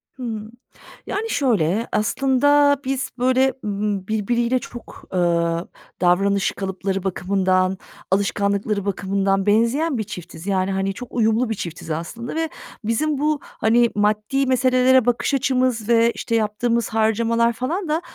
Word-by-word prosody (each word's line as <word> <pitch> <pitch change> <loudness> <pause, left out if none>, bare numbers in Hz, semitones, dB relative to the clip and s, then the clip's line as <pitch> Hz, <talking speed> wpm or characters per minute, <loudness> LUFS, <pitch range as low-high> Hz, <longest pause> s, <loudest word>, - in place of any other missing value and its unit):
Hımm, 225 -4 -6 0.6
yani, 430 +3 -3
şöyle, 225 - +1
aslında 285 +6 +3
biz 270 0 -2
böyle, 260 +1 +2
ımm, 205 -2 -2
birbiriyle 235 +4 0
çok, 240 -1 -11
eee, 185 - +1 0.8
davranış 195 +2 +2
kalıpları 190 0 -3
bakımından, 185 0 +1 0.3
alışkanlıkları 200 +1 0
bakımından 195 0 0
benzeyen 235 +8 +2
bir 220 - -1
çiftiz. 180 -2 -9
Yani, 190 -1 0
hani, 195 0 -1
çok 245 +4 -9
uyumlu 225 +1 +1
bir 225 - -1
çiftiz 170 -3 -7
aslında 230 - -5
ve 325 -1 -1 0.3
bizim 280 +8 0
bu, 300 +1 0
hani, 235 +2 +2
maddi 215 +6 +1
meselelere 255 0 +4
bakış 245 +3 0
açımız 255 -4 +1
ve, 230 0 +4
işte, 230 - -3
yaptığımız 230 +2 0
harcamalar 230 +1 +2
falan 320 - -3
da, 315 +2 +1
225 Hz, 130 wpm, -21 LUFS, 200-255 Hz, 0.8 s, meselelere